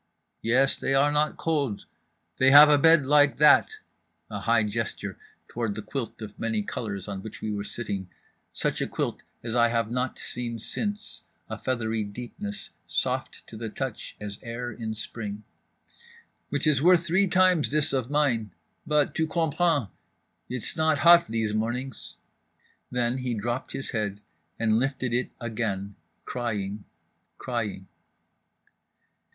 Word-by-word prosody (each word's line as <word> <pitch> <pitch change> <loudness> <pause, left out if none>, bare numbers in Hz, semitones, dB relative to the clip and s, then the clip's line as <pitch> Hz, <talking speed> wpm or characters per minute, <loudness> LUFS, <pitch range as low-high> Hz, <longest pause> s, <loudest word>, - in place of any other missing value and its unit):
"Yes—they 135 +3 +2
are 145 +2 +4
not 150 +1 +1
cold; 145 -10 -1 0.5
they 130 - +5
have 145 +2 +10
a 145 -1 +5
bed 160 -1 +6
like 145 0 +5
that" 150 - +5 0.5
(a - - -3
high 115 -1 +3
gesture 105 -1 -3 0.3
toward 115 -4 -3
the 110 - -5
quilt 115 0 -5
of 105 -1 -9
many 115 -2 -1
colours 100 -3 -5
on 100 -2 -5
which 110 - -9
we 110 - -3
were 100 -1 -3
sitting, 100 -4 -5 0.4
such - - -1
a - - 0
quilt - - -3 0.2
as 115 -1 -3
I 120 -1 +5
have 115 -1 0
not 125 +1 -1
seen 120 -1 -4
since; 205 - -3 0.3
a - - -2
feathery 115 -3 -1
deepness 105 -1 -6 0.2
soft - - -2
to - - -11
the 110 0 -5
touch 130 0 -5
as 105 -1 -6
air 120 +1 -5
in 110 -1 -5
Spring), 105 -1 -5 1.1
"which - - -1
is 150 -4 +3
worth 175 0 +5
three 190 +4 +3
times 185 -3 +4
this 150 -1 +2
of 130 -2 -1
mine—but 140 - 0
tu 160 - 0
comprends, 160 - +1 0.6
it's 125 -2 -3
not 160 -1 +2
hot 170 +2 +7
these 110 -2 -1
mornings"—then 120 +1 -4
he 125 -2 -2
dropped 120 +4 -3
his 135 - -4
head, 105 -3 -2 0.4
and 110 -1 +2
lifted 130 -2 -1
it 125 +1 0
again, 105 -4 -3 0.3
crying, 105 -4 -3 0.5
crying. 115 -6 -3
120 Hz, 140 wpm, -27 LUFS, 110-145 Hz, 1.1 s, have